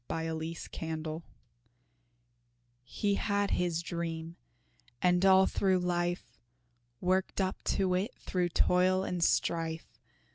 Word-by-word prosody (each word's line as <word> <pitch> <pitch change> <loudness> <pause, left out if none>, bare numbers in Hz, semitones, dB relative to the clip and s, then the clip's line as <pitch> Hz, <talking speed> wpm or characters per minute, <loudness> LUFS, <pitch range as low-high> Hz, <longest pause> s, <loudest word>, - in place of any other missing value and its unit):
HE - - -1
HAD 160 0 -3
HIS 165 +1 -6
DREAM 160 0 -4 1.6
He 200 +11 -1
had 200 0 0
his 170 -2 0
dream, 165 -1 -4 0.6
and 180 +3 +3
all 190 0 +7
through 190 -1 +2
life, 175 -8 -2 0.6
Worked 185 +2 0
up 190 -1 -1 0.2
to 190 -2 +2
it 195 +7 0
through 180 -1 -1
toil 185 +2 +3
and 180 -3 -1
strife. 165 -1 0
175 Hz, 115 wpm, -31 LUFS, 165-185 Hz, 1.6 s, all